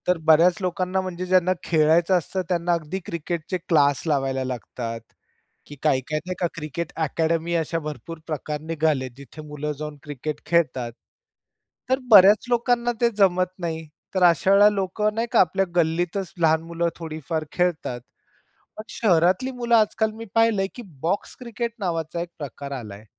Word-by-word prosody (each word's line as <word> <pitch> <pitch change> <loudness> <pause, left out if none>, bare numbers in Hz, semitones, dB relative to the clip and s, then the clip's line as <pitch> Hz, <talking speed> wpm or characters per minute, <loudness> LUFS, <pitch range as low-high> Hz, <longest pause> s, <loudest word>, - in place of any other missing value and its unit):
तर 180 -1 +3
बऱ्याच 165 +3 +6
लोकांना, 185 +1 -1
म्हणजे 185 -1 -5
ज्यांना 185 0 +3
खेळायचं 165 +3 +3
असतं, 185 +2 -3
त्यांना 175 -1 +1
अगदी 170 +3 -3
क्रिकेटचे 170 +2 -3
क्लास 150 -5 +2
लावायला 135 -3 0
लागतात. 120 -2 -5 0.7
की 145 - -11
काय-काय 150 0 +1
नाही, 185 0 -4
का 175 - +1
क्रिकेट 155 +1 -5
अकॅडमी, 165 +2 -1
अशा 165 0 -1
भरपूर 155 +1 -7
प्रकार 150 -1 -4
निघाले, 155 -4 0
जिथे 140 +3 -11
मुलं 150 0 -4
जाऊन 150 -1 -6
क्रिकेट 150 0 -5
खेळतात. 140 -7 +1 1.0
तर 260 +1 +2
बऱ्याच 205 +2 +8
लोकांना 240 0 +2
ते 235 - +5
जमत 185 -2 +3
नाही. 160 -2 -4 0.3
तर 185 - +2
अशा 175 +2 +4
वेळेला 205 +1 +7
लोकं 210 +1 -1
नाही 230 +1 -1
का 235 - +4
आपल्या 190 +2 +3
गल्लीतच 175 +3 0
लहान 160 -1 +4
मुलं 170 +1 -2
थोडीफार 160 -1 -4
खेळतात. 170 -9 -1 0.8
पण 215 - -6
शहरातली 185 +5 +2
मुलं 240 -2 0
आजकाल 220 0 +2
मी 225 - -7
पाहिलंय, 225 -4 +3
की 245 - -8 0.2
बॉक्स 175 +5 -2
क्रिकेट 235 -1 -4
नावाचा 165 -3 -2
एक 170 - -4
प्रकार 140 -1 -7
आलाय. 110 -5 -7
170 Hz, 155 wpm, -24 LUFS, 155-190 Hz, 1.0 s, बऱ्याच